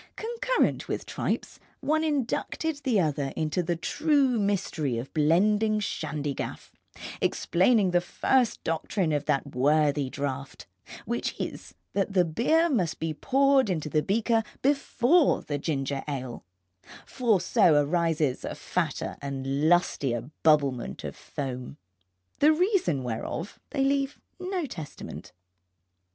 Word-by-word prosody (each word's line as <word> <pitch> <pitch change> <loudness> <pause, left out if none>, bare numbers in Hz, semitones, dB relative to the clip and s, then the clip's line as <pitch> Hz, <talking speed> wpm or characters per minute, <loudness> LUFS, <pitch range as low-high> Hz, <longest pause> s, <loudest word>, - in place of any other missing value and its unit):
Concurrent 475 +2 0
with - - -2
the - - -14
tripes, - - -3 0.2
one 315 +1 +1
inducted 300 +2 -1
the 260 -7 +1
other 145 -5 0
into 155 +3 0
the 175 0 -1
true 275 - +1
mystery 180 - -1
of 120 +4 -6
blending 210 +8 +3
shandygaff, 150 -7 -4 0.5
explaining 190 +2 +2
the 175 0 +3
first 250 +6 +1
doctrine 165 +2 -1
of 145 -1 -1
that 140 +1 -1
worthy 145 +1 +2
draught, 140 0 -5 0.4
which - - -3
is 85 - -6 0.2
that 195 0 0
the 180 -2 +4
beer 280 - +2
must 195 - 0
be 160 -1 -2
poured 270 - +3
into 160 -4 -2
the 155 0 +2
beaker 225 +5 +1 0.2
before 280 +2 +3
the 145 -1 -3
ginger 140 -2 -2
ale, 130 -4 -5 0.6
for 235 -6 +1
so 170 -2 +4
arises 160 -3 0
a - - -4
fatter - - -2
and 140 +2 -1
lustier 140 -7 +1
bubblement 140 - +2
of - - -5
foam. 130 -1 -6 0.6
The 300 +2 +6
reason 330 - +1
whereof 125 - -4
they 275 - 0
leave 275 +1 0 0.2
no 365 -2 -2
testament. 160 - -8
175 Hz, 125 wpm, -27 LUFS, -, 0.6 s, The